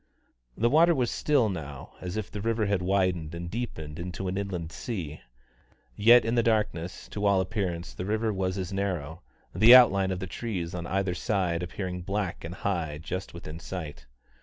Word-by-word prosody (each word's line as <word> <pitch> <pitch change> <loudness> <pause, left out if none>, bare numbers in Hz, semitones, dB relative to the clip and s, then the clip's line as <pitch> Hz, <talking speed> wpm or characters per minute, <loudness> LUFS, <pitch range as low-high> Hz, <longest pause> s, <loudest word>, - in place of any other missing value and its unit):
The 115 - +3
water 165 +6 +5
was 125 -4 0
as - - -4
still 140 -7 +3
now 75 -8 -6
as 90 +3 -4
if 110 -4 -4
the 105 - -5
river 115 0 0
had 100 -2 +1
widened 90 -4 0
and 85 0 -6
deepened 80 -10 -5
into 90 +2 -4
an 90 - -2
inland 90 -5 -3
sea; 85 -11 -5 0.7
yet 115 +3 +7
in 115 - 0
the 120 - +4
darkness 105 -6 -1
to 105 - -5
all 100 -1 +4
appearance 90 -2 -2
the 90 - -5
river 110 +1 0
was 95 0 -1
as 95 0 -4
narrow, 90 -5 -3 0.3
the 110 +6 +9
outline 100 -6 +6
of 95 - -1
the 95 - -4
trees 95 -3 -4
on 85 -1 -4
either 95 -1 0
side 90 -4 0
appearing 90 0 -4
black 95 0 -3
and 85 +2 -6
high 85 -7 -2
just 90 +4 -5
within 80 -1 -8
sight. 75 -9 -7
95 Hz, 185 wpm, -28 LUFS, 85-105 Hz, 0.7 s, the